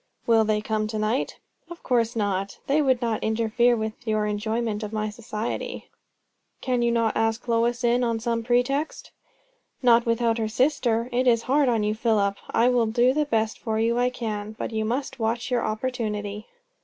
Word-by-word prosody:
"Will 225 -1 +4
they 215 -1 +1
come 215 0 -1
to 215 0 -4
night?" 215 +4 -1 0.3
"Of 345 0 -10
course 235 -2 +1
not! 200 -2 -1
They 290 +3 +2
would 260 -3 +2
not 230 -2 -1
interfere 230 +2 +2
with 220 +2 -5
your 215 -1 +1
enjoyment 215 +1 -2
of 210 -1 -5
my 215 -1 -2
society." 215 0 -5 0.7
"Cannot 250 -2 0
you 235 0 +2 0.2
ask 225 +2 -1
Lois 235 +1 +1
in, 240 +1 +3
on 230 -1 0
some 230 0 -1
pretext?" 245 +6 0 0.7
"Not 235 -1 +5
without 230 0 +1
her 220 - 0
sister. 235 -1 +1
It 250 +1 +1
is 230 -2 +4
hard 275 0 +2
on 225 -3 +1
you, 210 0 +1
Philip! 215 -3 +1
I 235 - +3
will 245 -2 +3
do 240 +3 +3
the 300 +1 +1
best 225 -5 -1
for 220 -2 -2
you 230 +2 +1
I 250 0 +3
can; 215 -3 -5
but - - -4
you 220 -1 -1
must 265 +3 -3
watch 230 +2 -1
your 245 -1 +2
opportunity." 215 -2 -3
230 Hz, 180 wpm, -25 LUFS, 215-245 Hz, 0.7 s, Not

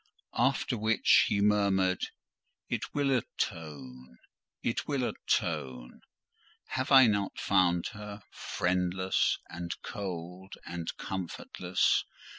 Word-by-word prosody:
After 125 -1 +2
which 110 +1 +4
he 100 - +1
murmured, 100 -3 +3 0.7
"It - - -2
will 140 -1 +1
atone—it 70 - -5
will 140 -3 0
atone. 60 -2 -2 0.7
Have 130 +2 -2
I 135 -1 +9
not 100 -3 0
found 90 -3 +3
her 105 -1 -8
friendless, 90 +1 0
and 85 0 -6
cold, 95 -2 -6
and 85 -1 -5
comfortless? 90 0 0
95 Hz, 90 wpm, -30 LUFS, 85-105 Hz, 0.7 s, I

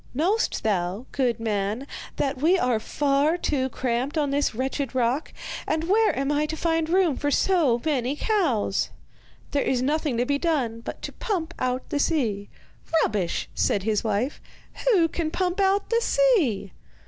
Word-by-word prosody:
'Know'st 380 - +1
thou, 195 +2 -1
good 250 -4 0
man, 215 +2 -1 0.3
that 275 -2 -1
we 345 +5 +4
are 250 -9 +1
far 285 +7 +1
too 265 -6 0
cramped 255 +4 -2
on 290 -2 +1
this 285 -4 0
wretched 265 +1 -2
rock, 255 +4 0 0.4
and 315 - 0
where 425 +3 +3
am 275 +1 0
I 295 +1 +1
to 315 - -4
find 325 -1 0
room 355 -5 +3
for 290 - -1
so 295 -7 +3
many 275 -3 0
cows?' 295 - 0 0.6
'There 285 - +1
is 255 -1 0
nothing 295 -2 0
to 245 - +1
be 280 +2 0
done 270 -10 0
but 230 - -8
to - - -4
pump 340 -6 -3
out 255 0 -1
the 290 - -1
sea.' 225 -11 0 0.5
'Rubbish!' 200 -5 -1
said 200 - +1
his 215 0 0
wife. 220 +5 -1 0.5
'Who 375 -9 +5
can 325 -1 -2
pump 360 +3 -1
out 395 +2 +2
the 465 0 +3
sea? 345 - +2
280 Hz, 165 wpm, -25 LUFS, 235-330 Hz, 0.6 s, Who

